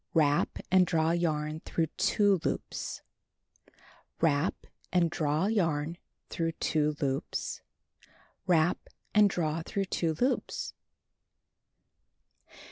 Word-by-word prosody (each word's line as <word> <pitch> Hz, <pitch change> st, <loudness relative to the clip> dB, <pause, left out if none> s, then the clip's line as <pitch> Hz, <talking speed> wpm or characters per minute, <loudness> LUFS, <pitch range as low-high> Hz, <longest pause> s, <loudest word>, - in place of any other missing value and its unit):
Wrap, 145 Hz, -2 st, +3 dB
and 185 Hz, -1 st, +5 dB
draw 160 Hz, 0 st, +2 dB
j'arn 155 Hz, -2 st, -1 dB
through 165 Hz, -, 0 dB
2 205 Hz, -3 st, +3 dB
loops. -, -, -3 dB, 1.2 s
Wrap, 155 Hz, 0 st, +2 dB, 0.4 s
and 175 Hz, -3 st, +3 dB
draw 155 Hz, +1 st, +1 dB
yarn 165 Hz, -6 st, 0 dB, 0.3 s
through 165 Hz, -1 st, -1 dB
2 150 Hz, -1 st, 0 dB
loops. 135 Hz, -3 st, -2 dB, 0.9 s
Wrap, 175 Hz, 0 st, +3 dB, 0.3 s
and 210 Hz, -1 st, +6 dB
d -, -, -5 dB
r -, -, +2 dB
a -, -, +2 dB
w 165 Hz, -, -4 dB
through 195 Hz, +3 st, -2 dB
2 165 Hz, -3 st, -1 dB
loops. 255 Hz, +2 st, -1 dB
165 Hz, 110 wpm, -30 LUFS, 155-180 Hz, 1.2 s, and